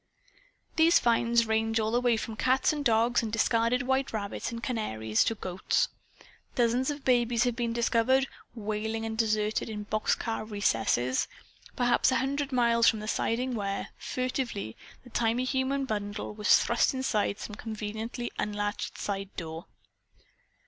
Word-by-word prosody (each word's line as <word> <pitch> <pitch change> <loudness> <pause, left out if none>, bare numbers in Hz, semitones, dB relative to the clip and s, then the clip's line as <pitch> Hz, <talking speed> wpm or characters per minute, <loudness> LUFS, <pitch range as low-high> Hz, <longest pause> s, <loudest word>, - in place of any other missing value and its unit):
These 330 +1 +6
finds 235 0 +3
range 225 0 +1
all 220 0 0
the 240 +1 +2
way 240 -2 +3
from 220 0 -5
cats 260 +6 +2
and 295 -1 -3
dogs 235 -1 +3
and 225 -2 -4
discarded 230 +2 +2
white 265 +1 0
rabbits 205 -1 -3
and 230 0 -6
canaries, 110 - 0
to 225 - 0
goats. 185 -3 0 0.7
Dozens 245 +2 +2
of 290 -1 -5
babies 240 -2 +3
have 245 -2 0
been 235 -1 -1
discovered, 235 +3 +2 0.3
wailing 220 +1 -3
and 220 0 -3
deserted, 215 -1 0
in 210 -1 -5
box 215 +1 0
car 225 -2 -3
recesses; 130 - +1 0.5
perhaps 245 +1 +3
a - - +2
hundred 280 +2 -1
miles 235 -2 +3
from 220 - -1
the 215 - -6
siding 250 +3 0
where, 200 -3 -3
furtively, 255 - -3 0.3
the 245 - -15
tiny 235 +2 +1
human 265 +1 0
bundle 205 -2 -4
was 210 0 +5
thrust 235 +3 +1
inside 215 -6 0
some 210 - -7
conveniently 220 +2 -5
unlatched 205 0 -2
side 195 -1 -3
door. 165 0 -6
230 Hz, 150 wpm, -29 LUFS, 210-245 Hz, 0.7 s, These